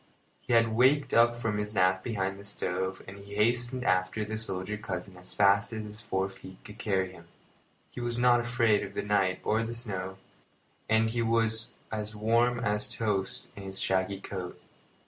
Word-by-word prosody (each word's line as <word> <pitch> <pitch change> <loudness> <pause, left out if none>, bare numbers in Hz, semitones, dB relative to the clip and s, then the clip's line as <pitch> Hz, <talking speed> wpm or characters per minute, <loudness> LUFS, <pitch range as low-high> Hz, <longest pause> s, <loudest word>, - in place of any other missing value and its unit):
He - - -3
had 115 -1 +4
waked 130 +3 +4
up 120 0 +5
from 110 -3 -1
his 105 +1 -4
nap 95 0 +3
behind 95 -4 -2
the - - -10
stove, 95 -1 -3
and 100 +1 -10
hastened 120 +5 0
after 95 +1 +1
the 110 +1 -4
soldier 100 -1 -2
cousin 95 -3 -5
as 90 0 -10
fast 100 +1 +4
as 110 -1 -3
his 105 +1 -9
four 95 -4 -1
feet 95 -1 -12
could 105 +1 -11
carry 95 -3 0
him. 85 -2 -15 0.6
He - - -6
was 120 0 -2
not 120 0 +5
afraid 120 -3 +2
of 100 - -8
the - - -1
night 95 -3 +1
or 110 +1 +2
the 115 +1 -3
snow, 95 -5 -5 0.7
and 110 0 +3
he 120 0 0
was 115 0 +1 0.2
as 105 -1 -4
warm 115 +3 +2
as 105 -3 0
toast 105 -4 -2
in 100 - -8
his 95 0 -2
shaggy 95 +1 0
coat. 95 -2 -6
105 Hz, 185 wpm, -29 LUFS, 95-115 Hz, 0.7 s, up